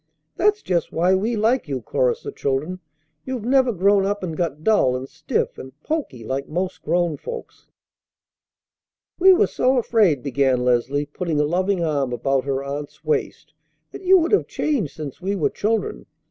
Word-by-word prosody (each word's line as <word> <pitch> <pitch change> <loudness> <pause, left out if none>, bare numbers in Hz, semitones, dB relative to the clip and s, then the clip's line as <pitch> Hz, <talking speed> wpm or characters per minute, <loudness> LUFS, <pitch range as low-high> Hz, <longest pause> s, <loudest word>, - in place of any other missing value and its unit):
"That's 420 +2 +2
just 170 -3 -1
why 175 +3 +2
we 215 +5 +1
like 225 +1 +1
you," 135 -3 -2
chorused 485 -2 0
the 425 - -5
children. 150 - -2 0.4
"You've 255 -4 -5
never 260 0 +3
grown 200 0 +3
up 205 0 -2
and 165 -3 -3
got 155 -3 -3
dull 180 -12 +3
and 130 +1 -5
stiff 155 +1 -2
and 130 +2 -11
poky 285 - -3
like 135 +4 -3
most 180 +4 -3
grown 170 -1 0
folks." 475 -1 -9 1.5
"We 380 +2 +8
were 365 - +5
so 255 +1 +1
afraid," 210 - +2
began 135 -2 +1
Leslie, 125 +4 +1
putting 155 +1 -3
a - - +4
loving 185 +3 0
arm 140 -5 0
about 135 +2 0
her 135 -1 -1
aunt's 145 +1 -7
waist, 445 -2 -2 0.4
"that - - -9
you 380 0 +6
would 335 -1 +1
have 415 - +3
changed 240 - -1
since 150 +1 -7
we 195 +2 -1
were 175 - 0
children. 225 - -2
175 Hz, 175 wpm, -22 LUFS, -, 1.5 s, We